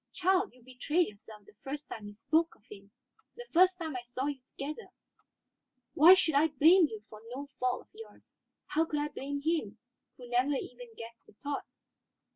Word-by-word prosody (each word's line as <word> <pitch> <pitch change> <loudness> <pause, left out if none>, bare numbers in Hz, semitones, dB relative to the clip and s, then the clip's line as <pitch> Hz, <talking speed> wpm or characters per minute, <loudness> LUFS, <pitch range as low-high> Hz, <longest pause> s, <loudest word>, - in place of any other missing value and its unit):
Child, 375 +2 +2
you 250 - -20
betrayed 295 +7 0
yourself 210 0 -14
the - - -18
first 290 +2 -6
time 210 -2 -7
you 205 - -9
spoke 320 +10 +1
of 215 - -30
him, 200 -1 -12 0.5
the 485 - -9
first 365 +2 +5
time 320 -5 -5
I 250 - -3
saw 245 +2 -4
you 285 -2 -3
together. 300 +10 -7 1.1
Why 335 +6 +9
should 330 -4 +1
I 290 +3 +5
blame 320 +4 +6
you 220 -6 -8
for 215 -1 -12
no 280 +2 -5
fault 250 0 0
of - - -23
yours? 450 +1 -14 0.3
How 320 +2 +1
could 300 -2 -2
I 295 0 -1
blame 285 0 -5
him, 305 -10 -1 0.4
who 245 - -11
never 250 +4 +2
even 245 -3 -7
guessed 230 0 -11
your - - -20
thought? 285 0 -4
280 Hz, 190 wpm, -31 LUFS, 240-320 Hz, 1.1 s, Why